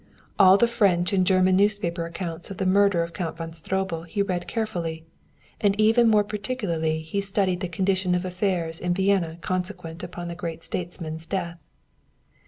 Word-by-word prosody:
All 190 -1 +8
the 235 - +5
French 200 -6 +2
and 185 -2 +2
German 185 -1 +4
newspaper 190 -4 +1
accounts 170 0 -5
of 195 - -7
the 190 - -1
murder 195 -2 +4
of 170 0 -7
Count 165 -4 -4
von 165 -1 -6
Stroebel 180 0 -2
he 200 +4 0
read 180 -3 -3
carefully; 175 -8 -3 0.5
and 205 0 +1
even 225 +2 +5
more 210 -1 +5
particularly 195 -8 -2
he 180 +6 -2
studied 195 -2 0
the 185 - -2
condition 185 +1 +1
of 180 +1 -1
affairs 180 -3 -1
in 175 0 0
Vienna 190 -4 +1
consequent 180 -2 -3
upon 175 0 -6
the 170 - -4
great 170 -1 -6
statesman's 165 -2 -5
death. 170 -3 -3
185 Hz, 170 wpm, -25 LUFS, 170-200 Hz, 0.5 s, All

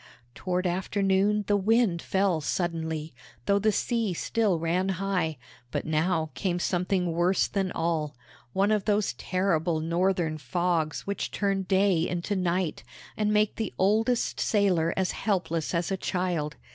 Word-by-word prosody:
Toward 180 +4 -2
afternoon 195 +3 +1
the 205 - +2
wind 205 -3 +2
fell 190 -4 +1
suddenly, 160 -1 -2 0.3
though 200 0 +3
the 215 +2 +3
sea 225 -3 0
still 210 -1 +1
ran 170 +4 0
high; 180 -5 -1 0.3
but - - -3
now 160 0 0
came 180 -3 -1
something 180 0 0
worse 175 +3 +2
than 195 -3 -1
all 160 -3 -1 0.4
one 195 - +2
of 210 -2 +1
those 210 -9 +1
terrible 175 +1 0
Northern 170 -1 0
fogs 160 +3 -1
which 200 0 -3
turn 195 -1 0
day 190 -2 +2
into 180 +4 -2
night, 180 -2 -1 0.3
and 210 -1 0
make 210 0 +2
the 220 -4 -3
oldest 220 +5 +1
sailor 185 -6 +2
as 190 -1 +1
helpless 170 -6 -1
as 170 +1 -1
a 195 - 0
child. 180 -5 -2
185 Hz, 145 wpm, -27 LUFS, 165-200 Hz, 0.4 s, though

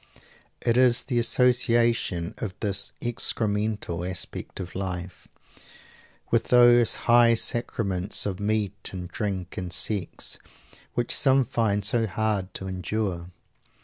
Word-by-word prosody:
It 115 0 +2
is 125 -1 +4
the 125 -3 -1
association 120 -7 +2
of 100 -3 -4
this 100 -2 -2
excremental 105 -6 -2
aspect 90 +1 -4
of 90 -1 -6
life, 90 -2 -5 1.0
with 115 -1 +2
those 120 -2 +5
high 120 0 +6
sacraments 100 -5 -1
of 95 -3 -3
meat 105 -1 -2
and 90 -1 -5
drink 95 -2 -4
and 90 -2 -4
sex, 95 +1 0 0.6
which 120 0 0
some 135 -2 +3
find 105 -4 0
so 115 +1 +2
hard 105 -3 -1
to 95 - -5
endure. 95 -1 -3
105 Hz, 115 wpm, -26 LUFS, 95-120 Hz, 1.0 s, high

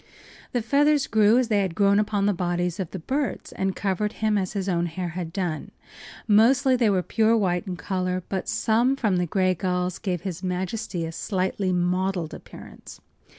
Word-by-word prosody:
The 245 -3 -1
feathers 290 +4 +3
grew 215 +1 +4
as 255 -2 +2
they 210 -2 +3
had 185 -4 -2
grown 200 0 +4
upon 205 -1 0
the 205 - +3
bodies 175 -1 -2
of 185 -4 -3
the - - -6
birds 260 - -3
and 190 -1 -2
covered 205 +2 -1
him 215 -1 0
as 190 -3 -1
his 195 -2 -3
own 175 -2 +1
hair 175 +2 -4
had 170 -1 -5
done. 170 -5 -3 0.6
Mostly 255 +5 +5
they 240 -3 +3
were 185 -3 +1
pure 225 +3 +2
white 185 -2 0
in 185 - -3
color, 185 -1 -2
but 190 -1 -3
some 235 +4 +2
from 215 -8 +1
the 180 0 0
gray 185 +2 +2
gulls 180 0 -2
gave 180 -4 -2
his 185 -3 -5
majesty 185 0 -3
a 165 - -5
slight 185 +3 -2
mottled 180 -1 0
appearance. - - -12
190 Hz, 190 wpm, -25 LUFS, 180-215 Hz, 0.6 s, Mostly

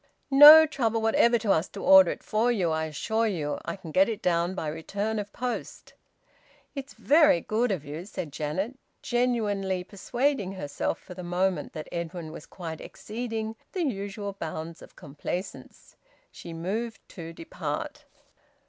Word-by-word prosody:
"No 300 +3 +11
trouble 235 -7 0
whatever 230 +2 +3
to 220 -3 0
us 165 -1 +2
to - - -8
order 190 -2 +8
it - - -5
for 225 +3 +1
you, 185 -8 0
I 160 0 0
assure 220 +9 -1
you. 150 -8 -2
I - - -3
can 185 -5 -10
get 190 +6 +4
it 220 -3 -3
down 175 +1 +1
by 160 - -3
return 200 +8 -3
of 205 0 -6
post." 250 +2 -5 0.8
"It's 275 -1 -7
very 300 - +5
good 220 +7 0
of 170 -7 -3
you," 155 +5 -6
said 165 -7 -6
Janet, 190 - -3 0.2
genuinely 210 -7 0
persuading 210 +2 -1
herself 145 -7 -3
for 180 - -12
the 180 - -8
moment 180 +1 -1
that 155 -2 -7
Edwin 170 -1 -5
was 160 - -10
quite 165 -3 -7
exceeding 225 -1 -5 0.2
the 365 - -1
usual 200 -5 -3
bounds 165 -2 -6
of - - -15
complaisance. 175 +6 -7 0.4
She 170 - -10
moved 205 +7 -4
to 165 -2 -8
depart. 165 0 -5
195 Hz, 155 wpm, -27 LUFS, 170-225 Hz, 0.8 s, No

